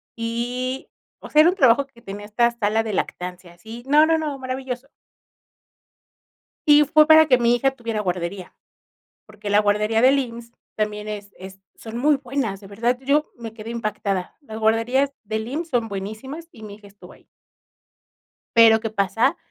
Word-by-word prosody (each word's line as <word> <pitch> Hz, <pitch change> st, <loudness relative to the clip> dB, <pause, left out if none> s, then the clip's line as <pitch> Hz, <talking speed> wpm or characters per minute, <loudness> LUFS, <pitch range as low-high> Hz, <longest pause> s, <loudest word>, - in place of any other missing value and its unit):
y, 245 Hz, +3 st, -3 dB, 0.3 s
o -, -, -11 dB
sea, 300 Hz, -, +6 dB
era 325 Hz, -, +6 dB
un 365 Hz, -, -1 dB
trabajo 270 Hz, -5 st, +4 dB
que 235 Hz, -3 st, -22 dB
tenía 205 Hz, 0 st, -8 dB
esta 235 Hz, +3 st, +2 dB
sala 225 Hz, -1 st, 0 dB
de 220 Hz, -2 st, -4 dB
lactancia, 180 Hz, -1 st, -5 dB
sí, 225 Hz, +6 st, -10 dB
no, 300 Hz, +2 st, +6 dB
no, 325 Hz, 0 st, +2 dB
no, 300 Hz, -3 st, -4 dB
maravilloso. 260 Hz, 0 st, -5 dB, 1.8 s
Sí, 295 Hz, 0 st, +8 dB
fue 305 Hz, +2 st, +5 dB
para 315 Hz, 0 st, +7 dB
que 255 Hz, -4 st, +4 dB
mi 240 Hz, 0 st, +3 dB
hija 270 Hz, +3 st, +2 dB
tuviera 230 Hz, -3 st, -3 dB
guardería, 180 Hz, -1 st, -4 dB, 0.7 s
porque 205 Hz, -, -8 dB
la 205 Hz, +1 st, +5 dB
guardería 210 Hz, +2 st, +1 dB
del 265 Hz, +2 st, +5 dB
IMSS 235 Hz, -3 st, -5 dB, 0.2 s
también 210 Hz, -1 st, -3 dB
es 205 Hz, -1 st, -7 dB
es 190 Hz, +1 st, -11 dB, 0.2 s
son 225 Hz, 0 st, -9 dB
muy 290 Hz, +4 st, +3 dB
buenas, 255 Hz, -6 st, -3 dB
de 200 Hz, -, -13 dB
verdad, 230 Hz, +5 st, -1 dB
yo 285 Hz, +3 st, +1 dB
me 225 Hz, -2 st, -8 dB
quedé 225 Hz, 0 st, -8 dB
impactada. 210 Hz, -5 st, -3 dB
Las 220 Hz, -7 st, -9 dB
guarderías 230 Hz, +5 st, +1 dB
del 220 Hz, 0 st, -4 dB
IMSS 310 Hz, +7 st, -4 dB
son 240 Hz, -4 st, 0 dB
buenísimas 220 Hz, +11 st, -7 dB
y 220 Hz, -7 st, -13 dB
mi 205 Hz, -1 st, -9 dB
hija 205 Hz, -1 st, -15 dB
estuvo 200 Hz, 0 st, -16 dB
ahí. -, -, -20 dB, 1.3 s
Pero, 225 Hz, -1 st, +7 dB
¿qué 225 Hz, -, -3 dB
pasa? 220 Hz, -, +1 dB
230 Hz, 170 wpm, -22 LUFS, 210-265 Hz, 1.8 s, Sí